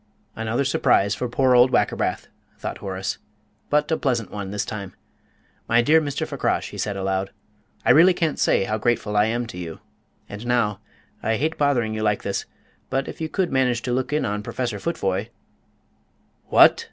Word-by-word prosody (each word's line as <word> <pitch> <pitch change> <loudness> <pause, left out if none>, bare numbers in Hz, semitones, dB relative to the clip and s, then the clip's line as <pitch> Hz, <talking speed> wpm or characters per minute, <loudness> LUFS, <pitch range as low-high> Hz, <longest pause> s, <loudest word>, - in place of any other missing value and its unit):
"Another 115 +5 -1
surprise 100 -6 +3
for 125 +4 -3
poor 130 +1 +3
old 125 +1 +6
Wackerbath," - - 0 0.3
thought - - -5
Horace, 95 0 -4 0.5
"but 150 +2 +1
a - - +4
pleasant 120 -6 -1
one 100 -2 -5
this 105 +1 -2
time. 100 -3 -6 0.7
My 115 +1 +4
dear 160 +5 +5
Mr. 145 -2 -2
Fakrash," - - -1
he - - -8
said 100 -2 -2
aloud, 95 0 -1 0.6
"I - - +6
really 170 +7 +6
can't 165 -4 -1
say - - +3
how 110 +3 -2
grateful 110 -2 0
I 105 0 +5
am 120 +2 -1
to 90 -6 -8
you. 85 -2 -7 0.5
And 105 +4 -8
now 110 -5 +1 0.4
I 110 - 0
hate 155 +6 -1
bothering 125 -7 +1
you 110 - -3
like 105 -1 0
this, 100 - -2 0.4
but 135 0 -1
if - - -8
you 160 - -2
could 185 +1 -1
manage 125 -3 +1
to 125 - -1
look 130 +2 -1
in 150 - +1
on 105 +1 -2
Professor 115 0 -3
Futvoye 100 - -2 0.6
" - - -41
"What!" - - +7
115 Hz, 185 wpm, -23 LUFS, 105-135 Hz, 0.7 s, What